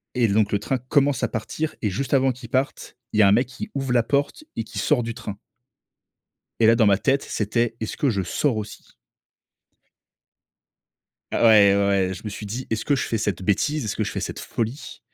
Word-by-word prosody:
et 120 -3 +3
donc 105 0 +2
le 100 - +2
train 125 +6 -2
commence 135 +1 +1
à - - +2
partir 115 +8 -4
et 105 - +1
juste 135 +6 -2
avant 135 -1 +3
qu'il 120 -1 -11
parte, 130 +3 -2 0.2
il 110 - +2
y - - +8
a 100 - +7
un - - +5
mec 120 +3 +3
qui 125 - -8
ouvre 135 -2 -2
la 120 -2 +4
porte 140 - -1
et 115 - -2
qui 110 - -8
sort 130 -5 +2
du 115 0 -4
train 105 -4 -7 1.2
et 110 - +5
là 115 - +6
dans 115 - +4
ma 100 -1 +4
tête, 135 +4 +1
c'était: 115 +2 -1
«Est-ce 110 - -4
que 140 - +1
je 100 -3 -1
sors 115 - 0
aussi?» 105 0 -6 2.5
Ah - - +2
ouais, 100 -3 +7
ouais, 100 0 +2
ouais, 95 -1 +1
je - - -9
me - - -3
suis 105 +1 -7
dit: 120 +6 -5
«Est-ce 110 - -1
que 145 - +2
je - - -1
fais 115 - 0
cette 105 -4 -2
bêtise? 115 +8 0
Est-ce 105 - -3
que - - 0
je - - -3
fais - - -3
cette - - -5
folie?» 115 +5 -5
115 Hz, 225 wpm, -23 LUFS, 105-130 Hz, 2.5 s, y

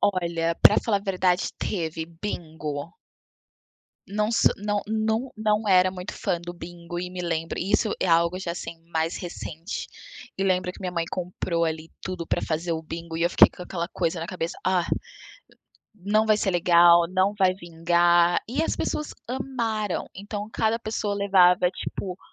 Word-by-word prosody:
Olha, 170 -3 +1
pra - - +8
falar 205 -4 +1
a - - -12
verdade 185 -2 +1
teve: 165 -4 -3
bingo. 160 -4 -5 1.1
Não 210 +2 -1
so - - +5
não 205 0 -1
não 220 +4 -1
não 215 0 +1
era 185 -1 +5
muito 180 -1 -6
fã 170 - -2
do 175 0 -7
bingo 175 0 -8
e 180 0 -5
me 185 - -6
lembro 165 -2 -2
isso 205 +3 +1
é - - +1
algo 170 +1 +3
já, 180 -3 -3
assim, 170 -1 -7
mais 160 0 -1
recente. 170 -1 -6 0.5
E 195 - -1
lembro 185 -1 +1
que - - -14
minha 180 -2 -3
mãe 170 -1 0
comprou 175 -1 -2
ali 160 0 -3
tudo 180 -3 -4
pra - - 0
fazer 165 +2 -1
o 160 -1 -3
bingo 165 0 -6
e 165 - -1
eu 170 - +2
fiquei - - +8
com - - -10
aquela 175 -1 -4
coisa 170 -2 -1
na 165 - -4
cabeça 170 -2 -4
"Ah, 185 -2 +2 1.1
não 215 +2 +1
vai 215 -1 +4
ser 205 -2 0
legal, 175 -1 +6
não 190 +3 +1
vai 185 -2 +4
vingar" 175 0 +3
e 270 +7 0
as - - 0
pessoas 300 - -3
amaram. 235 -6 -2
Então 205 +2 -6
cada 225 0 +1
pessoa 215 -2 -2
levava, 185 -3 +4
tipo 185 0 -5
180 Hz, 170 wpm, -25 LUFS, 170-205 Hz, 1.1 s, pra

